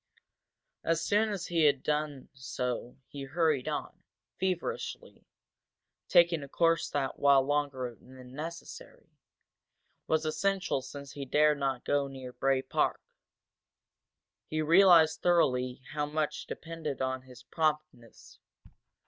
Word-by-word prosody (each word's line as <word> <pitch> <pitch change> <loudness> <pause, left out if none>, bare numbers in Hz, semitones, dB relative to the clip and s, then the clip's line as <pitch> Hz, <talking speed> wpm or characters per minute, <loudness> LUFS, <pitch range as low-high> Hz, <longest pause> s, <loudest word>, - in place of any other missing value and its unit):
As 165 0 +1
soon 210 +4 +2
as 195 -4 -3
he 165 -3 +2
had 140 -2 +3
done 150 -3 -2
so 125 -2 -4
he 140 - -9
hurried 155 -2 +1
on, - - -4 0.4
feverishly, 185 -3 -4 0.8
taking 170 -2 +4
a 140 - -7
course 165 +3 +1
that, 135 -2 -2
while 140 -1 +5
longer 140 -3 -1
than 125 +1 -15
necessary, 165 +4 -9 1.0
was 160 0 +1
essential 190 -2 0
since 140 +1 -9
he 145 -1 -6
dared 150 +2 +3
not 135 -3 -2
go 145 -1 +1
near 130 -2 -9
Bray 135 0 +1
Park. - - 0 1.4
He 155 - -3
realized 165 -1 +6
thoroughly 130 -7 +2
how 150 0 -1
much 150 0 -2
depended 160 -4 -5
on 130 0 -1
his 125 -2 -15
promptness. 150 -6 -3
145 Hz, 120 wpm, -30 LUFS, 130-165 Hz, 1.4 s, realized